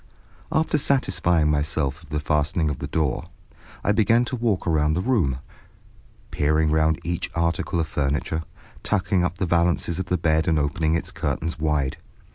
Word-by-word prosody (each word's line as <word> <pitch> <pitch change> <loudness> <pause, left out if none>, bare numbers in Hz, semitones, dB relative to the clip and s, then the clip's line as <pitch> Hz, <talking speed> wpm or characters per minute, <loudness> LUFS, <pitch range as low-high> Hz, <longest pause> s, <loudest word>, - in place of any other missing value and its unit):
After 155 -1 +1
satisfying 90 - +2
myself 75 0 -1
of 80 - -18
the 75 0 -1
fastening 75 +1 0
of 70 - -5
the - - -4
door, 75 -4 -1 0.5
I - - +2
began 115 +3 +3
to 130 - -3
walk 115 -6 0
round 75 -2 +2
the - - +2
room, 95 - +1 0.9
peering 75 +1 +2
round 80 0 +2
each 85 0 -2
article 85 +1 0
of 80 - +1
furniture, 75 +3 -1 0.4
tucking 95 -2 +1
up 90 +1 -1
the 95 - 0
valances 85 0 +1
of 95 - -3
the 90 - +1
bed 80 -1 +1
and 80 -2 +3
opening 80 +2 +1
its 85 - -3
curtains 85 -1 -3
wide. 75 -2 0
80 Hz, 165 wpm, -24 LUFS, 75-90 Hz, 0.9 s, began